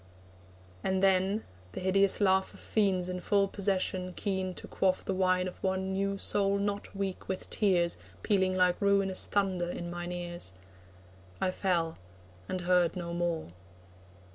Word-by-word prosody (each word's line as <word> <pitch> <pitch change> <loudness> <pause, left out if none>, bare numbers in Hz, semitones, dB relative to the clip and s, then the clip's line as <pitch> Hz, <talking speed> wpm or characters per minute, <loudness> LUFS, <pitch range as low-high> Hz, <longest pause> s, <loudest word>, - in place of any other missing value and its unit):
And 190 0 0
then 195 +2 +3 0.3
(the - - -4
hideous 195 +1 +3
laugh 190 -2 +2
Of - - -14
fiends 190 -4 +1
in 180 0 -3
full 200 +1 +2
possession, 185 -2 -1
keen 190 -2 -2
to - - -8
quaff 185 -1 0
The 195 - -1
wine 185 -1 +2
of 180 - -9
one 190 0 -1
new 195 +1 -1
soul 200 0 +1
not 200 0 -3
weak 195 -1 -3
with 190 - -4
tears, 175 -5 +2 0.3
Pealing 190 -3 +2
like 180 +1 +3
ruinous 200 -2 +3
thunder 185 -4 0
in 175 -1 -5
mine 175 0 -5
ears) 175 - -4 0.9
I 185 - +1
fell, 170 -4 0 0.5
and 185 - -2
heard 175 -1 +3
no 170 -2 -4
more. 170 - -1
185 Hz, 150 wpm, -30 LUFS, 180-195 Hz, 0.9 s, then